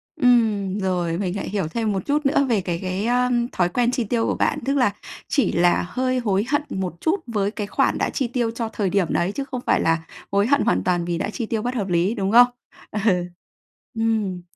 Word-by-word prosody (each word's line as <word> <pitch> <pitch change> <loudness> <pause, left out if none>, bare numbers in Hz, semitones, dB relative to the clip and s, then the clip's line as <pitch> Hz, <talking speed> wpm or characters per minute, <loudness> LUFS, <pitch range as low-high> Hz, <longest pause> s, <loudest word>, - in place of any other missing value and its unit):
Ừm, 220 - +2
rồi, 175 -3 -1
mình 185 -2 -2
lại 200 - -4
hiểu 195 -5 -1
thêm 220 +5 -1
một 190 -2 -3
chút 295 +1 0
nữa 280 0 +3
về 215 -5 +2
cái 175 -2 -3
cái, 185 +3 -2
ơ, 250 +1 +2 0.2
thói 175 -1 +1
quen 240 +5 +1
chi 250 -1 0
tiêu 225 +1 0
của - - 0
bạn. 295 - 0
Tức 275 +1 +1
là 250 -6 +3 0.4
chỉ 280 - +1
là 175 +1 +2
hơi 255 +2 0
hối 205 -4 +1
hận 290 +1 +2
một 185 -3 -3
chút 355 +5 +1
với 205 -3 -1
cái 210 -2 -4
khoản - - +1
đã - - 0
chi 265 - -1
tiêu 235 -1 -1
cho 230 -1 -4
thời 205 -3 -1
điểm 195 -2 +1
đấy, 175 +3 0
chứ 275 - -3
không 255 -2 -6
phải - - +2
là 165 0 +2 0.3
hối 200 +2 +2
hận 285 +2 +3
hoàn 90 +1 +1
toàn 175 - 0
vì 170 -1 -2
đã 200 - -2
chi 230 +2 -4
tiêu 220 -1 -2
bất 245 +2 -3
hợp 205 -5 -1
lý, 180 +5 +1
đúng 195 -2 -1
không? 245 +1 +8 0.4
Ừ. 210 - -2 1.0
Ừm. 215 -5 0
210 Hz, 235 wpm, -22 LUFS, 185-245 Hz, 1.0 s, không